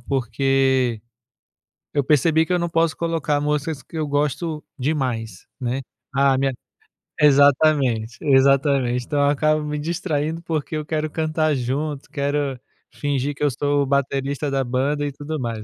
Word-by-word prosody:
porque 130 -1 +1 0.9
eu 145 - +2
percebi 155 +3 +3
que 180 - -1
eu 180 - +2
não 170 0 -1
posso 165 -1 +1
colocar 160 -3 -1
músicas 150 0 -2
que 165 - -9
eu 155 -1 -1
gosto 150 +2 -1 0.2
demais, 125 - -2
né. 130 +1 -2 0.3
Ah, 135 -1 +4
minha 135 0 +1 0.7
exatamente, 140 -5 +4
exatamente, 135 -2 +3
então 145 - -1
eu 145 0 +4
acabo 155 +1 +2
me 150 0 -3
distraindo, 160 0 -2
porque 160 -2 -3
eu 155 - -2
quero 155 0 -2
cantar 155 -1 0
junto, 140 +3 -3
quero 140 -2 -1 0.3
fingir 145 0 -2
que 145 - -5
eu 145 - +3
sou 145 +2 +1
o - - -2
baterista 140 +1 -1
da 135 -1 0
banda, 135 +4 0
e 145 - -2
tudo 145 +3 -5
mais, 115 -4 -4
145 Hz, 155 wpm, -22 LUFS, 135-155 Hz, 0.9 s, Ah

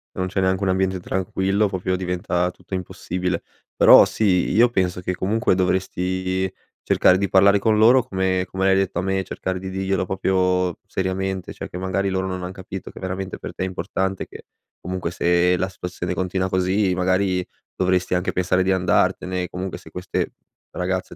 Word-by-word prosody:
non 95 - -1
c'è 95 +1 -1
neanche 95 +1 +1
un 95 - +1
ambiente 95 0 +1
tranquillo, 95 +3 0
proprio 95 -1 -1
diventa 90 -1 -1
tutto 95 - -14
impossibile. 90 -1 -3 0.3
Però - - +8
sì, 95 -5 +1
io 120 +4 +5
penso 90 -5 0
che 90 0 -2
comunque 110 +3 +1
dovresti 95 0 -1 0.3
cercare 90 - +4
di 100 0 -1
parlare 100 +1 +5
con 110 0 +2
loro, 120 +4 +6
come 95 -2 0
come 95 0 -1
l'hai 95 0 +4
detto 95 -2 0
a - - 0
me, 95 0 0
cercare 95 0 -4
di 95 +1 -6
dirglielo, 95 -1 -1
proprio, 90 -1 +1
seriamente, 95 0 -3
cioè, - - -7
che - - -7
magari 95 +1 -1
loro 95 0 -1
non 90 -1 -4
han 90 - -4
capito 95 0 -8
che - - -12
veramente 95 0 -4
per - - -7
te - - -3
è - - 0
importante 95 +1 -3
che - - -12 0.4
comunque, 90 -1 -3
se 90 +1 +2
la 95 +2 -1
situazione 90 -1 -5
continua 95 +1 -1
così, 95 +1 +1
magari, 90 0 +1 0.3
dovresti 90 0 +1
anche 90 +1 0
pensare 90 0 +1
di 95 - +2
andartene. 90 0 +1
Comunque, 90 +1 -5
se - - -14
queste 90 -1 -3 0.4
ragazze 95 +1 -3
95 Hz, 180 wpm, -22 LUFS, 90-95 Hz, 0.4 s, Però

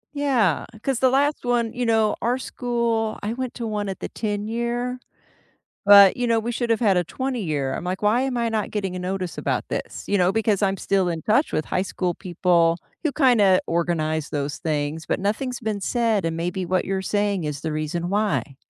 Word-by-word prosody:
Yeah, 245 - +1 0.2
'cause 270 -3 0
the 260 - +4
last 285 +2 +1
one 240 -2 0
you 245 -1 -2
know, 220 -2 +3
our 245 +2 +1
school 235 -4 -1
I 215 +2 -1
went 255 0 -4
to 235 - -4
one 210 -2 -2
at 190 - -5
the - - -5
ten-year, 235 +4 -2 0.9
but, 200 0 +8
you 245 - 0
know, 230 -1 +2
we 235 +2 -3
should've 230 -2 0
had 200 -6 +3
a 175 - +2
twenty-year. 170 - -2
I'm - - -5
like, 185 +2 -3
"Why 215 +4 +3
am 265 -2 -1
I 235 -1 0
not 215 -2 -2
getting 195 -3 -2
a - - -4
notice 185 -1 -3
about - - -1
this?" - - -5
You 205 - +2
know? 180 +1 +3
Because 215 -2 +1
I'm 195 0 +2
still 190 -2 +1
in 165 -2 -3
touch 250 +8 +2
with 155 - 0
high 185 - 0
school 180 -3 -2
people 175 -2 +2 0.3
who 305 - +1
kinda 220 -10 +4
organize 160 -2 -1
those 145 0 -2
things, 155 0 -2
but - - -1
nothing's 240 +5 -2
been 215 -3 -2
said, 225 -4 0
and 165 0 -1
maybe 180 +2 -2
what 185 +1 0
you're 190 0 -2
saying 205 -3 0
is 150 -1 -4
the 160 - -3
reason 160 +3 -2
why. 200 -9 -1
205 Hz, 205 wpm, -23 LUFS, 175-235 Hz, 0.9 s, but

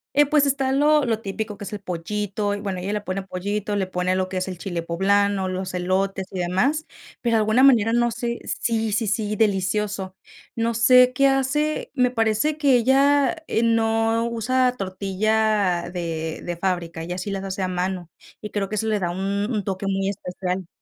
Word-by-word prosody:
Y, 290 +1 +6
pues, 290 0 +3
está 270 -1 0
lo 295 +1 +4
lo 225 -3 0
típico 210 +1 -4
que - - -8
es - - -7
el 210 - -4
pollito, 205 +3 -3
y 205 - -4
bueno, 195 -3 -4
ella 190 +3 -3
le 210 - -1
pone 195 -1 -3
pollito, 205 +2 -3
le 190 -2 -1
pone 180 0 -1
lo 185 0 0
que 185 - -7
es 185 - -2
el 185 - -6
chile 175 -2 -4
poblano, 195 +3 +1
los 185 0 -4
elotes, 190 +1 -1
y 190 - -5
demás, 250 - +1 0.4
pero 230 -2 +2
alguna 220 +4 +3
manera 230 -5 +5
no 240 0 +2
sé 235 +1 -3
sí, 225 -2 -1
sí, 220 +2 0
sí, 210 0 -1
delicioso. 195 -1 0 0.4
No 230 0 0
sé 250 +2 +6
qué 275 +2 +4
hace, 270 +3 0
me 250 -3 +2
parece 225 +6 +1
que 285 -4 +4
ella, 275 +4 +3
eh, 225 - +1
no 225 0 +2
usa 250 +2 +1
tortilla 195 -1 0
de 165 -3 -4
de 175 -1 -4
fábrica, 170 -3 -2
ella 175 +2 -4
sí 185 +2 -4
las 195 -1 -3
hace 195 0 -4
a 185 - 0
mano, 180 -1 -3 0.3
y 210 - -6
creo 200 -2 -2
que 215 - -4
eso 220 +1 -1
le 215 -2 +1
da 175 -2 -1
un 185 +2 -5 0.3
un 215 -4 -1
toque 190 +1 -4
muy 195 0 0
especial. 185 -2 -4
205 Hz, 200 wpm, -23 LUFS, 185-235 Hz, 0.4 s, Y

